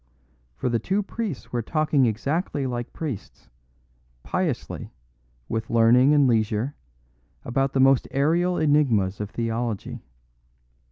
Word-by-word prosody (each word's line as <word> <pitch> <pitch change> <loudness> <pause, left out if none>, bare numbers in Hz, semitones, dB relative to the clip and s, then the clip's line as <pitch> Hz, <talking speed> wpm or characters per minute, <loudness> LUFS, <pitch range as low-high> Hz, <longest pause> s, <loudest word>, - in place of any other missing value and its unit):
For - - -3
the 120 -2 +1
two 195 - 0
priests 200 - -5
were 120 - 0
talking 150 0 +2
exactly 140 - -1
like 120 -2 -4
priests, 145 -11 -7 0.7
piously, - - -3 0.6
with 110 0 -3
learning 120 +4 +5
and 145 -2 +5
leisure, 110 +2 +1 0.7
about 135 +2 0
the 135 - +1
most 135 -1 +4
aerial 170 +6 +1
enigmas 120 -11 +2
of 105 - -4
theology. 115 -1 -3
130 Hz, 115 wpm, -24 LUFS, 115-150 Hz, 0.7 s, learning